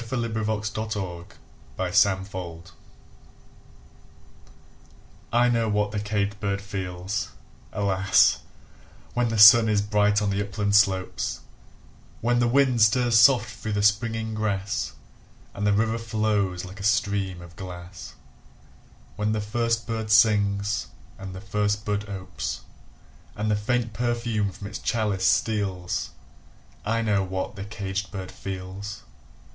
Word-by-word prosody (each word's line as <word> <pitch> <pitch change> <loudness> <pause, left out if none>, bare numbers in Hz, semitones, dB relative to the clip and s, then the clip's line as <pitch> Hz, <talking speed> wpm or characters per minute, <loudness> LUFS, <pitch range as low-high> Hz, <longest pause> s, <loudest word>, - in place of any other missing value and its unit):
Paul 130 -1 -1
Laurence 110 -2 -2
Dunbar 100 -6 -4 0.6
Sympathy 95 -4 0 2.6
I 120 +1 +4
KNOW 115 -2 +1
what 105 0 0
the 105 - -2
caged 100 -1 -2
bird 100 -1 -1
feels, 95 0 -4 0.4
alas! 95 -1 +3 0.7
When 120 -1 +1
the 115 - -2
sun 110 +2 +9
is 105 -1 +2
bright 105 0 +2
on 105 -1 0
the 100 +1 0
upland 100 0 -1
slopes; 95 -3 +1 0.8
When 120 +1 +1
the 120 - +3
wind 130 -1 +3
stirs 115 +1 +4
soft 120 -1 +5
through 110 0 -5
the 100 0 0
springing 110 +1 +1
grass, 105 -2 -2 0.6
And 105 +1 -1
the - - +4
river 110 +2 +1
flows 105 -5 -1
like 95 +3 -10
a - - -7
stream 100 -3 0
of 85 -1 -13
glass; 90 -1 -9 1.0
When 105 +1 0
the 110 - 0
first 115 +2 -1
bird 110 -2 -3
sings 105 -2 +3 0.3
and 95 -1 -7
the 95 - -8
first 105 +1 -1
bud 105 0 -2
opes, 95 -2 -5 0.7
And 105 +1 -1
the - - +3
faint 115 +2 -1
perfume 115 -3 -1
from 100 +3 -10
its 100 +1 -6
chalice 105 -5 0
steals 95 -5 0 0.7
I 115 +2 0
know 100 -3 +2
what 95 0 -4
the 95 - -6
caged 100 -1 -4
bird 95 -3 -6
feels! 95 +2 -7
105 Hz, 130 wpm, -25 LUFS, 95-110 Hz, 2.6 s, sun